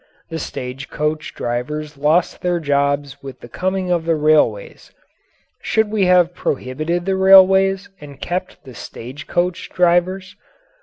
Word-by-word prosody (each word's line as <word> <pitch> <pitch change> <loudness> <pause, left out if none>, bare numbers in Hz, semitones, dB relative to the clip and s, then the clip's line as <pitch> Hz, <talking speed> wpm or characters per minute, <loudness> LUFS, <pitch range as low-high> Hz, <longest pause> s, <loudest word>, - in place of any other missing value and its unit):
The 165 - -4
stage 130 -1 -7
coach 150 0 -3
drivers 150 +6 -4
lost 150 +5 +1
their 175 -1 0
jobs 140 -1 -1
with 135 -1 -10
the - - -10
coming 185 +6 -2
of 170 -2 0
the 165 -1 +1
railways. 150 -9 +1 0.7
Should 220 -1 0
we 210 -3 +1
have 180 -1 +4
prohibited 155 +3 -3
the 190 0 0
railways 190 +1 +5
and 140 -2 -12
kept 185 +4 -5
the 130 - -12
stage 130 +5 -10
coach 175 0 -2
drivers? 180 +1 +1
165 Hz, 140 wpm, -19 LUFS, 140-185 Hz, 0.7 s, railways